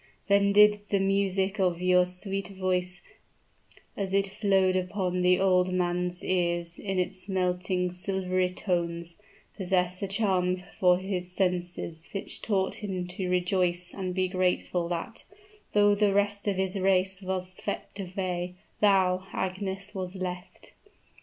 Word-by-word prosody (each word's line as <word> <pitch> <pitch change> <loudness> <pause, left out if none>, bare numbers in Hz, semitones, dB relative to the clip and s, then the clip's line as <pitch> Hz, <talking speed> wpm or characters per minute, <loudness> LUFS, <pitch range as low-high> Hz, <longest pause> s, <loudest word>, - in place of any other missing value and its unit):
Then 200 0 +4
did 210 +1 +6
the 200 - +2
music 195 0 +1
of 180 -3 +1
your 180 0 +4
sweet 195 +2 -2
voice, 185 -2 -2 0.9
as 195 -1 -2
it 195 0 +3
flowed 195 -2 +2
upon 185 -1 -1
the 180 0 +4
old 185 -1 +3
man's 180 0 -1
ears 175 -2 -1
in 195 -2 -3
its 185 +2 -2
melting, 180 -1 0
silvery 185 0 0
tones, 170 -2 -2 0.4
possess 180 -2 0
a 200 - -1
charm 190 -3 +1
for 180 0 +2
his 185 -1 -3
senses 175 -3 -2
which 195 - -4
taught 195 -3 0
him 185 -3 -3
to 185 0 -4
rejoice 180 -1 +1
and 185 -2 -4
be 185 -1 +1
grateful 180 -1 0
that, 175 +6 -4 0.5
though 205 0 +5
the 205 -1 +2
rest 205 0 0
of 200 - +2
his 190 +1 -1
race 190 0 +2
was 185 -1 -2
swept 200 - -5
away, 180 -2 -3 0.2
thou, 190 -2 +3
Agnes, 190 +1 -3
was 185 -1 -4
left! 180 -1 -6
185 Hz, 140 wpm, -28 LUFS, 180-195 Hz, 0.9 s, did